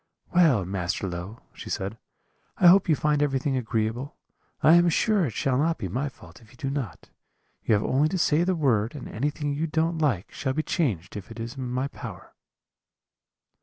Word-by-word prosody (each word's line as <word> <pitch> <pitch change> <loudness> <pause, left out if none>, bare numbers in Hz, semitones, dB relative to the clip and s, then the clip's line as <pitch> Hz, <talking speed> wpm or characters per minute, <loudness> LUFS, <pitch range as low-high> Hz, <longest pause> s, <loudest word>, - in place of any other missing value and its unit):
"'Well, 155 - +4
Master 95 +1 -2
Low,' 90 +5 -6
she - - -9
said, 95 +3 -3 0.6
'I 180 - +6
hope 185 0 +5
you 155 - +5
find 150 0 +1
everything 135 -1 0
agreeable; 115 +2 -2 0.5
I 155 - +7
am 175 0 +6
sure 200 +1 +2
it 115 - -6
shall 130 +3 0
not 165 +2 +1
be 100 - -4
my 130 +10 -2
fault 130 - -16
if 110 - -19
you - - -19
do 135 -3 -3
not; 130 -11 -5 0.5
you 110 - +3
have 100 - 0
only 145 +4 +2
to 185 - -1
say 165 -1 +3
the 185 +1 +1
word 120 -6 +1
and 145 - -7
anything 145 +4 -2
you 155 +3 -1
don't 160 +1 0
like 125 - 0
shall 130 -1 -2
be 155 - -1
changed, 105 - -1
if 105 +1 -7
it 115 0 -9
is 115 +1 -5
in 130 -2 -4
my 130 +2 -1
power.' - - -10
135 Hz, 200 wpm, -26 LUFS, 110-155 Hz, 0.6 s, I